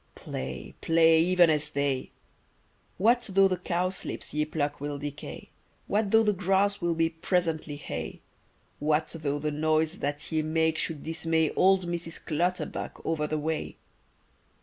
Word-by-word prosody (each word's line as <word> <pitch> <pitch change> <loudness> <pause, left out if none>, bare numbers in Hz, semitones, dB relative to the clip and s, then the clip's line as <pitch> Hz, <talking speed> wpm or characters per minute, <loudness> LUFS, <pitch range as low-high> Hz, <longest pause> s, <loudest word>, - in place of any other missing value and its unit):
Play, 65 0 -6
play, 165 0 +5
even 175 -1 +5
as 150 -1 0
they! 140 -2 -1 0.9
What 235 +6 +4
though 195 +1 +6
the 185 -1 -1
cowslips 180 +1 -2
ye 150 0 +1
pluck 145 -2 -2
will 145 0 -3
decay, 145 0 -7 0.3
What 210 0 0
though 225 +2 +5
the 210 -1 +3
grass 195 +2 +1
will 170 -1 +1
be 165 0 +3
presently 160 -3 -1
hay? 145 - -6 0.6
What 155 +1 +1
though 145 -3 -2
the 150 +1 -2
noise 155 +3 +1
that 145 +3 -2
ye 160 -1 +2
make 160 +1 +1
should 155 -3 -3
dismay 160 -1 0
Old 190 -1 +4
Mrs. 170 -1 -4
Clutterbuck 175 +4 -2
over 155 -2 0
the 155 - -1
way? 155 +1 -3
160 Hz, 150 wpm, -28 LUFS, 150-180 Hz, 0.9 s, though